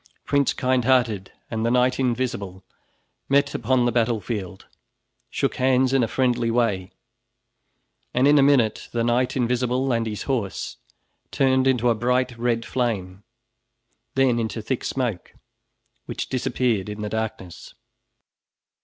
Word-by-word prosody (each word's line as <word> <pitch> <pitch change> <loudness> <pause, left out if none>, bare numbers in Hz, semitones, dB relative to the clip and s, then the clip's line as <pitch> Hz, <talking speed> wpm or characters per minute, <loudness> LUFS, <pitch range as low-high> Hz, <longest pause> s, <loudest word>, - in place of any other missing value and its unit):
Prince 140 -1 +2
Kindhearted 125 -6 +1 0.2
and 110 -1 -2
the 115 - +2
Knight 125 +1 +2
Invisible 120 -7 -2 0.7
met 140 +1 +3
upon 130 -2 +1
the 120 - +2
battle 115 -1 +1
field, 95 -2 -6 0.6
shook - - -1
hands 130 0 +2
in 135 - +4
a 115 - +1
friendly 125 -1 +1
way, 115 -6 0 1.2
and 130 +3 +3
in 145 0 +6
a - - +6
minute 135 -6 +2
the 115 -1 0
Knight 120 +3 +1
Invisible 125 +1 0
and 115 -1 0
his 105 -2 -4
horse 115 -8 -3 0.5
turned 130 -1 +2
into 125 -2 +2
a 120 - +4
bright 125 +2 0
red 115 -1 0
flame, 105 -7 -2 0.9
then 130 -3 +3
into 110 -1 -3
thick 120 +4 -3
smoke, 120 -9 -3 0.7
which - - -4
disappeared 120 -5 0
in 105 0 -6
the 105 - -3
darkness. 110 -5 -5
120 Hz, 135 wpm, -23 LUFS, 110-130 Hz, 1.2 s, in